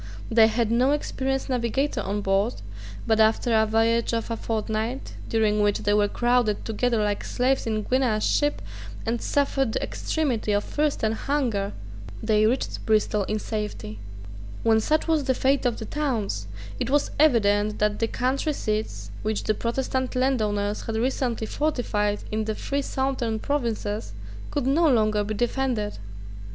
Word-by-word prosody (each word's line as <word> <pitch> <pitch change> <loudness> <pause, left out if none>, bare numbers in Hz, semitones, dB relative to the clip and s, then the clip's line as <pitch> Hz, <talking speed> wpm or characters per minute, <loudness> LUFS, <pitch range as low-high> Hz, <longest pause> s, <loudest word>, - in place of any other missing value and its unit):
They 225 -1 +7
had 225 0 0
no 255 +4 +3
experienced 270 -2 -2
navigator 255 +3 0
on 205 +2 -2
board: 195 +4 +1 0.5
but 220 -1 +2
after 220 +2 +3
a 220 0 +4
voyage 230 +2 +2
of 230 0 -3
a - - 0
fortnight, 220 +3 -3 0.2
during 215 -2 +2
which 205 -1 +2
they 205 - +2
were 205 0 +4
crowded 240 -1 +1
together 225 0 +1
like 205 -1 -1
slaves 255 0 0
in 220 -1 0
a - - -1
Guinea 250 -2 +1
ship, 290 +6 +1 0.4
and 230 +1 -1
suffered 270 -4 +1
the - - -1
extremity 250 -9 -1
of 205 0 +1
thirst 300 -4 -1
and 220 0 +2
hunger, 225 -7 -1 0.5
they 215 -1 +3
reached 250 +4 -1
Bristol 210 -2 +2
in 215 - -1
safety, 210 - -5 0.6
When 225 -1 +4
such 305 +9 +1
was 315 -3 +2
the 260 -1 +2
fate 270 0 +2
of 240 - -1
the 220 - -6
towns, 220 - -2 0.3
it - - -1
was 290 +1 +2
evident 210 -7 +3
that 210 0 +1
the 225 - +1
country 265 +6 0
seats 215 -4 -3
which 215 -1 -1
the 215 - +1
Protestant 260 +3 -2
landowners 210 -6 0
had 225 - -4
recently 240 -1 0
fortified 215 -7 -1
in 215 0 -1
the 220 0 -2
three 280 +5 -2
southern 265 -5 -1
provinces 220 - -2 0.4
could 285 -3 -2
no 310 +5 +4
longer 215 -3 +2
be 215 +1 -3
defended. 240 - -1
225 Hz, 160 wpm, -25 LUFS, 215-265 Hz, 0.6 s, They